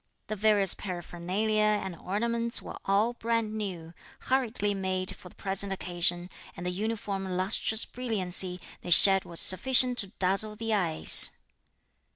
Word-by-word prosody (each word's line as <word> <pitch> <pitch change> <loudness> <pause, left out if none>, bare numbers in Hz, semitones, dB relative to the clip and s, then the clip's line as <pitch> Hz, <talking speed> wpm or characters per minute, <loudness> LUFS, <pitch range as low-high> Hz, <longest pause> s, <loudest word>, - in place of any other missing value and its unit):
The 215 - -6
various 205 -2 +3
paraphernalia 185 +3 -4
and 210 -4 -1
ornaments 235 +6 -2
were - - -10
all 205 +5 0
brand 230 -2 -3
new, 180 -6 -7 0.3
hurriedly 240 -6 -2
made 185 -1 -3
for 180 - -14
the - - -22
present 195 0 0
occasion, 175 -1 -2 0.3
and 175 - -8
the 180 - -3
uniform 205 0 -5
lustrous 190 +4 0
brilliancy 190 -6 -3 0.2
they - - -9
shed 195 +2 +7
was 170 - -2
sufficient 250 +5 +5
to 200 - +3
dazzle 195 +2 -1
the 225 0 -4
eyes. 175 -6 +4
195 Hz, 140 wpm, -27 LUFS, 185-220 Hz, 0.3 s, shed